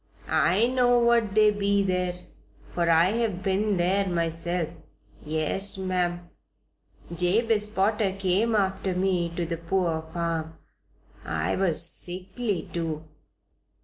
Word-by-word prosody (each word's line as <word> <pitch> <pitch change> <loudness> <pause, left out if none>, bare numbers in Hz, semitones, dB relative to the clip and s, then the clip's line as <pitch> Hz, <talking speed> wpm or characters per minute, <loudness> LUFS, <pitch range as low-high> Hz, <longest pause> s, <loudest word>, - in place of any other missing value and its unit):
I 185 +8 +3
know 245 -1 +3
what 235 -3 +2
they 215 -1 +5
be 200 -1 +1
there, 180 -2 -1 0.6
for 170 -1 0
I 165 +3 +4
have 210 -6 -2
been 200 +1 +1
there 190 +3 +1
myself. 170 0 -1 0.5
Yes, 160 +6 0
ma'am! 180 -2 -2 0.9
Jabez 210 +5 +2
Potter 210 -1 0
came 195 +4 +1
after 190 -2 0
me 180 -2 0
to 175 - -2
the 165 0 -4
poor 170 -1 -1
farm. 165 -2 -3 0.7
I 80 +3 -2
was 175 -4 +2
sickly, 185 +2 -3
too. 160 -2 -3
185 Hz, 115 wpm, -26 LUFS, 170-205 Hz, 0.9 s, they